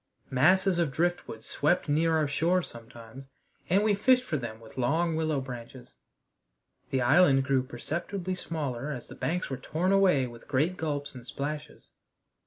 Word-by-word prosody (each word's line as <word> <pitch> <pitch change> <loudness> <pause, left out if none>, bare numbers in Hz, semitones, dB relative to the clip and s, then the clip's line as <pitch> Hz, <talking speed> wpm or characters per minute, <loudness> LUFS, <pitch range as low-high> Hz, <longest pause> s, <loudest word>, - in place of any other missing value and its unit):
Masses 180 +7 +4
of 165 -5 +1
driftwood 165 -8 -2
swept 155 +5 +1
near 160 +2 +2
our 155 -2 +1
shores 170 +5 +1
sometimes, 115 +3 -12 0.4
and 195 +4 +4
we 215 -1 +3
fished 250 +5 +4
for 210 - -3
them 120 -5 -5
with 115 -1 -15
long 160 +7 +1
willow 155 -2 0
branches. 125 -1 -9 1.0
The 130 - 0
island 140 -1 +5
grew 135 -1 +2
perceptibly 170 +9 -4
smaller 150 -7 -4
as 125 -5 -5
the - - -12
banks 180 -3 -2
were 135 - -2
torn 160 +8 -1
away 185 -9 +4
with 120 -1 -11
great 150 +6 +1
gulps 145 -3 -3
and 125 -2 -10
splashes. 150 +1 -6
150 Hz, 160 wpm, -28 LUFS, 130-175 Hz, 1.0 s, island